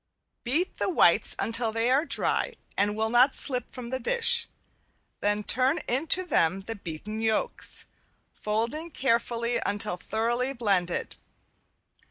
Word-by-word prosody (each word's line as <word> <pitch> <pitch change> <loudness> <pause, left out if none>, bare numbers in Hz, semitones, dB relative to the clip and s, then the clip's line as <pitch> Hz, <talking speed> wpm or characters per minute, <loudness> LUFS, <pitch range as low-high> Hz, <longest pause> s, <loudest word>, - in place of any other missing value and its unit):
Beat 310 +10 -1
the - - 0
whites 360 - +3
until 230 0 0
they 230 +2 0
are 280 +5 +3
dry - - -1 0.2
and 205 +1 +1
will 220 +1 0
not 250 +3 +5
slip 250 -4 0
from 245 -2 -8
the 260 - -2
dish, 470 - +3 0.7
then 205 +1 0
turn 260 +8 +2
into 320 +8 +3
them 190 - +1
the 225 +4 -5
beaten 205 +3 -7
yolks, 220 -1 -1 0.5
folding 230 +10 -2
carefully 235 -3 0
until 205 -2 -1
thoroughly 240 +7 -1
blended. 195 -8 -1
235 Hz, 130 wpm, -27 LUFS, 215-260 Hz, 0.7 s, not